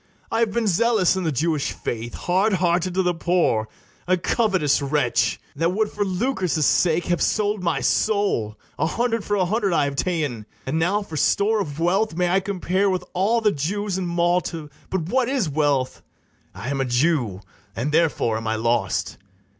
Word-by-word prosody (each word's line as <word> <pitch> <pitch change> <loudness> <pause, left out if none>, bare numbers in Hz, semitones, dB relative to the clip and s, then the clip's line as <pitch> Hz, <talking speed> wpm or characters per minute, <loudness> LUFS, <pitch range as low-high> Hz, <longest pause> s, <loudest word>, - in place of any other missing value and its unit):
I 225 - +1
have 230 -2 +2
been 230 +2 0
zealous 210 -1 +3
in 190 -2 -2
the 160 - +1
Jewish 150 +1 0
faith, 120 0 -5
Hard 190 +4 +1
hearted 175 0 +1
to 190 - +2
the 180 0 +1
poor, 165 -11 +1 0.4
a 185 0 +3
covetous 185 - +1
wretch, 135 -5 +1 0.2
That 165 +4 0
would 215 +1 0
for 205 - -1
lucre's 185 - 0
sake 170 +3 +2
have 175 -1 0
sold 210 -1 +1
my 170 -2 0
soul; 200 - +1 0.2
A 160 - +2
hundred 230 +3 -1
for 205 - -1
a 190 -2 +2
hundred 200 0 0
I 150 -3 +3
have 140 0 -3
ta'en; 145 - -2 0.2
And 155 +5 -1
now 200 +6 +1
for 160 -5 -7
store 210 +7 +2
of 150 -5 -5
wealth 190 +3 +1
may 180 0 +1
I 190 +2 +3
compare 195 0 0
With 185 -1 -1
all 205 +6 +2
the 215 -2 +3
Jews 190 +6 -2
in 180 - -2
Malta: 170 -3 -1 0.2
but 190 - -1
what 245 +8 0
is 260 - 0
wealth? 145 -3 0 0.5
I 125 - -6
am 135 -1 -1
a - - 0
Jew, 120 - +1 0.3
and 130 +6 -2
therefore 150 -8 +1
am 115 0 -5
I 110 - 0
lost. 110 -4 -1
175 Hz, 185 wpm, -23 LUFS, 145-200 Hz, 0.5 s, zealous